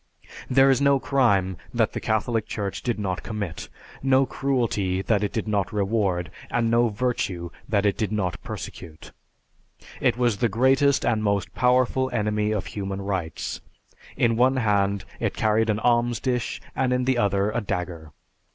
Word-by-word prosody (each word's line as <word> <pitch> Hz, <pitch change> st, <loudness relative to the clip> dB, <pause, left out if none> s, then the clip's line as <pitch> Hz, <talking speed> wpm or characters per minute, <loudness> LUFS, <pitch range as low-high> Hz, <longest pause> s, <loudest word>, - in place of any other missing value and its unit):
There 135 Hz, +1 st, +5 dB
is 135 Hz, -, +2 dB
no 140 Hz, -1 st, +4 dB
crime 100 Hz, -11 st, +2 dB, 0.2 s
that -, -, +2 dB
the -, -, -3 dB
Catholic 110 Hz, 0 st, 0 dB
Church 100 Hz, -3 st, -4 dB
did 120 Hz, -3 st, -1 dB
not 95 Hz, -4 st, -2 dB
commit, 100 Hz, -7 st, -5 dB, 0.3 s
no 135 Hz, 0 st, +4 dB
cruelty 115 Hz, -9 st, -1 dB
that 105 Hz, 0 st, +1 dB
it 105 Hz, -, -1 dB
did 110 Hz, -, -3 dB
not 100 Hz, -2 st, 0 dB
reward, 100 Hz, -6 st, 0 dB, 0.2 s
and 115 Hz, -1 st, +1 dB
no 120 Hz, 0 st, +4 dB
virtue 100 Hz, -7 st, -2 dB, 0.2 s
that 100 Hz, -1 st, +1 dB
it 100 Hz, -, +2 dB
did 110 Hz, -2 st, -1 dB
not 95 Hz, -5 st, -2 dB
persecute. 80 Hz, -4 st, -8 dB, 0.9 s
It -, -, +2 dB
was 120 Hz, -4 st, +1 dB
the 120 Hz, +1 st, +1 dB
greatest 130 Hz, +5 st, +3 dB
and 110 Hz, -2 st, +1 dB
most 100 Hz, -3 st, 0 dB
powerful 130 Hz, +1 st, +2 dB
enemy 105 Hz, -2 st, 0 dB
of 105 Hz, -3 st, -1 dB
human 100 Hz, -1 st, -4 dB
rights. 95 Hz, -6 st, -3 dB, 0.6 s
In 115 Hz, -1 st, +3 dB
one 130 Hz, +2 st, +4 dB
hand, 100 Hz, -4 st, +1 dB
it -, -, -1 dB
carried 110 Hz, +1 st, +2 dB
an 105 Hz, -, +2 dB
alms 120 Hz, 0 st, +2 dB
dish, 125 Hz, 0 st, -2 dB, 0.2 s
and 130 Hz, -1 st, +1 dB
in 125 Hz, 0 st, +1 dB
the 130 Hz, -2 st, +2 dB
other, 100 Hz, 0 st, +1 dB
a 120 Hz, +2 st, -1 dB
dagger. 85 Hz, -6 st, -4 dB
110 Hz, 165 wpm, -24 LUFS, 100-125 Hz, 0.9 s, There